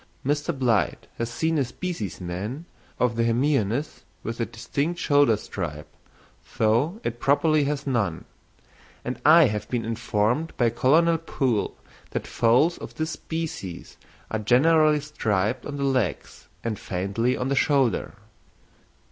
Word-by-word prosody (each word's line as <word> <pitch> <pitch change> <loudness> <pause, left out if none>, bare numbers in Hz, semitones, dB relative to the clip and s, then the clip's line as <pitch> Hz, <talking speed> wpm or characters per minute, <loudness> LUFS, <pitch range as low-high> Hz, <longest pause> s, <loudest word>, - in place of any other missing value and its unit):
Mr. 145 +4 0
Blyth 120 - 0
has 115 0 -1
seen 160 +5 0
a - - +3
specimen 115 - -5 0.3
of 125 -2 +2
the 115 - +1
hemionus 120 +2 0 0.2
with 115 +2 -5
a 115 - 0
distinct 145 +9 -3
shoulder 145 -7 +4
stripe, 75 -8 -6 0.6
though 120 - +2
it 120 +1 -3
properly 150 +3 +3
has 145 0 -2
none; 110 - -1 0.8
and 125 - -4
I 165 +3 +8
have 105 -6 -1
been 120 -2 -1
informed 115 +6 -1
by 120 -2 +3
Colonel 160 +7 +3
Poole 130 -9 -1 0.3
that - - -3
foals 125 +9 +2
of - - -9
this 160 0 -2
species 160 - -6 0.3
are 110 - -1
generally 150 +7 +4
striped 115 -6 -1
on 145 -1 -5
the 140 - -2
legs 130 - -1 0.2
and 110 -3 -3
faintly 100 +7 -1
on 125 - -2
the 140 - +1
shoulder. 135 -6 +1
125 Hz, 135 wpm, -25 LUFS, 110-150 Hz, 0.8 s, I